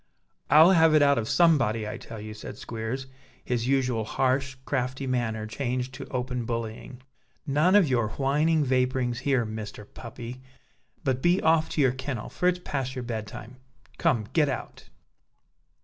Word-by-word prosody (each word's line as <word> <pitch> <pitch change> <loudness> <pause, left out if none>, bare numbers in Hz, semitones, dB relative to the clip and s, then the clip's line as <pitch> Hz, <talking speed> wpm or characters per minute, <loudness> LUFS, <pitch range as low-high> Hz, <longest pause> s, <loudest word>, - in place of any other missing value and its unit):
"I'll 155 +5 +8
have 165 -3 +5
it 150 - +6
out 140 -3 +4
of 110 - -4
somebody, 125 -11 +3
I 105 - -5
tell 115 - -9
you," 105 +1 -7
said 105 - -9
Squeers, 115 +4 -5 0.4
his 120 -1 -1
usual 130 -4 +1
harsh, 130 +3 0
crafty 130 0 -2
manner 120 -4 -1
changed 125 +2 -3
to - - -8
open 125 -1 -3
bullying. 115 +2 -5 0.4
"None 155 +6 +3
of 200 -6 +6
your 120 -5 +1
whining 150 +3 +2
vapourings 125 -2 0
here, 135 -4 +1
Mr. 110 -1 -7
Puppy: 120 +3 -9 0.6
but 130 -3 0
be 175 +4 +3
off 160 0 +3
to 155 - +1
your 130 -3 +4
kennel, 130 -3 -5
for 180 - -1
it's 180 0 +3
past 135 -6 -4
your 125 - -4
bed 110 -3 -4
time! 125 +4 -10 0.4
Come, 110 -4 +2
get 150 -3 +3
out!" 135 - -6
130 Hz, 165 wpm, -27 LUFS, 115-140 Hz, 0.6 s, I'll